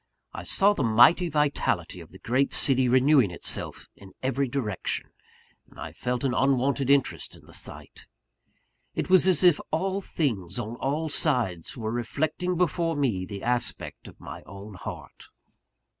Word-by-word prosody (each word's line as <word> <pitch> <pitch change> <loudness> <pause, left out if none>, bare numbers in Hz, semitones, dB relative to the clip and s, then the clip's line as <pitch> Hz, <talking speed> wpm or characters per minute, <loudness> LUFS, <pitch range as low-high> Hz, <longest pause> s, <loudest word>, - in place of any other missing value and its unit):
I - - -6
saw 200 +2 +4
the 200 - -3
mighty 125 +10 +5
vitality 140 - 0
of 85 -2 -12
the 95 - -14
great 130 +8 0
city 130 -2 +2
renewing 130 -2 +4
itself 85 - -4
in 95 -1 -15
every 135 +1 0
direction; 120 -7 -3 0.6
and - - -17
I - - -6
felt 125 0 -3
an 135 -2 +1
unwonted 135 0 +1
interest 140 -1 +1
in - - -18
the - - -16
sight. - - -3 0.9
It - - -3
was 185 0 +6
as 185 -2 +4
if 175 -5 +6
all 190 +5 -1
things, 115 - -2
on 115 -1 -4
all 150 +5 -1
sides, 120 - -1
were 110 -2 -3
reflecting 155 +9 -2
before 170 -1 0
me 115 -11 -1
the 100 +1 -7
aspect 120 0 -3
of - - -14
my - - -9
own 100 +2 -10
heart. 95 - -9
130 Hz, 160 wpm, -26 LUFS, 110-155 Hz, 0.9 s, was